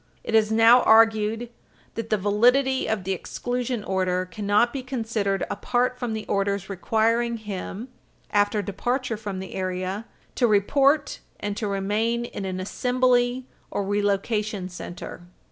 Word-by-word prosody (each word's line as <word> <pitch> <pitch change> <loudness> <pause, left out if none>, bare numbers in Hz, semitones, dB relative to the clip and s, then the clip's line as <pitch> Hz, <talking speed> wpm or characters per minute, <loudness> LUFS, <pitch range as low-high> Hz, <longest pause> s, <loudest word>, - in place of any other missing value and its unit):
It - - -5
is 220 -1 +4
now 225 +3 +7
argued 225 +1 +4 0.4
that 225 -1 -5
the 215 - +2
validity 245 +7 +2
of 220 -3 -1
the 190 - -2
exclusion 245 +5 -3
order 185 -1 0
cannot 205 +5 +1
be 275 - -3
considered 225 -6 -2
apart 250 +4 -1
from 245 -3 -2
the 220 -1 -4
orders 200 -1 -1
requiring 230 +4 +1
him, 210 +1 -6 0.4
after 205 0 +2
departure 240 +5 -2
from 210 -3 -5
the 190 0 -7
area, 185 +3 -3 0.3
to 245 - +2
report 275 +8 +2 0.2
and 205 -1 -3
to 210 0 -3
remain 210 +4 0
in 200 -4 -6
an 185 -1 -3
assembly 250 +4 +1 0.2
or 200 - -2
relocation 205 0 -1
center. 175 -1 -8
215 Hz, 140 wpm, -25 LUFS, 200-240 Hz, 0.4 s, now